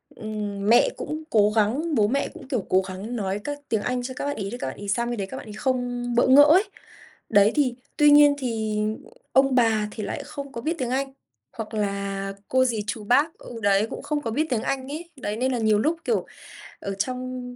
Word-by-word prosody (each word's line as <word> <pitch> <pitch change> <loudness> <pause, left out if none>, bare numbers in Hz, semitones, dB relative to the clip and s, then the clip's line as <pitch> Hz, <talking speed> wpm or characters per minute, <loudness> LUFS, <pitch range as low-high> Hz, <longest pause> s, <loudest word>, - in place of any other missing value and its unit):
ừm, 210 -1 -4
mẹ 240 - +6
cũng 310 +1 -5
cố 210 -1 +4
gắng 270 +10 +1
bố 205 -1 +4
mẹ 275 +5 0
cũng, - - -12
kiểu, 250 -8 -2
cố 190 +1 +4
gắng 195 +6 -6
nói 200 -2 -2
các 290 +2 -4
tiếng 220 -2 +1
Anh 250 +1 -2
cho 260 +1 -5
các - - -4
bạn 285 - -2
ấy 195 -1 -4
để 245 - -5
các 245 - -4
bạn 130 - -6
ấy 205 0 -8
sang 235 +4 0
bên 240 - -3
đấy 195 -1 -3
các - - -7
bạn - - -9
ấy 210 - -8
không 245 0 -2
bỡ 240 - +4
ngỡ 275 +3 +8
ấy. 325 +7 +6 0.7
Đấy, 205 0 +5
thì 265 -5 +2 0.2
tuy 295 -1 +6
nhiên 290 0 +7
thì 220 -4 -2 0.5
ông 270 0 +4
bà 220 -3 +3
thì 215 - -6
lại - - -4
không 280 -1 -7
có 235 - -6
biết 320 +7 -1
tiếng 250 -2 -1
Anh, 270 +1 -1 0.4
hoặc 225 0 -7
là 200 -1 -2
cô 260 0 +3
dì 225 -4 -1
chú 215 - -4
bác 280 +9 +2
ừ 235 -2 -9
đấy, 200 +2 +3
cũng - - -6
không 295 -1 -1
có 230 -5 -3
biết 305 +7 +1
tiếng 240 -4 0
Anh 265 -1 -2
ấy, 330 +4 -6
đấy, 220 -6 -4
nên 260 +2 0
là - - 0
nhiều 215 -1 +3
lúc, 315 +9 +1
kiểu, 465 - 0 0.5
ở 200 - -4
trong 250 +3 -4
240 Hz, 240 wpm, -24 LUFS, 210-270 Hz, 0.7 s, ngỡ